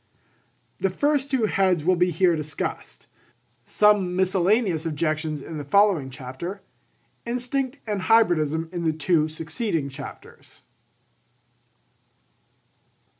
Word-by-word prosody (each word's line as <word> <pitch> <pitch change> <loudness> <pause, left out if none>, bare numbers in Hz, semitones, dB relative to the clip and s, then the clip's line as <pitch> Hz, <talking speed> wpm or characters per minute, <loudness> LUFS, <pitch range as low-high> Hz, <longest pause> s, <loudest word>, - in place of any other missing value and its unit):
The 195 - +1
two 180 - -11
first 285 -1 +1
heads 195 - +1
will 185 +1 +4
be 180 +1 +2
here 175 +1 +2
discussed; 155 0 -5 0.6
some 205 +1 +3
miscellaneous 190 -1 +2
objections 155 -1 -2
in 160 -2 -7
the - - -5
following 185 -3 +3
chapter; 135 +9 -7 0.6
Instinct 250 +3 -2
and 210 -3 -2
Hybridism 165 -7 +2
in 175 -1 -3
the 160 -1 +1
two 160 -1 +2
succeeding 160 - -3
chapters. 135 - -11
180 Hz, 105 wpm, -24 LUFS, 155-210 Hz, 0.6 s, will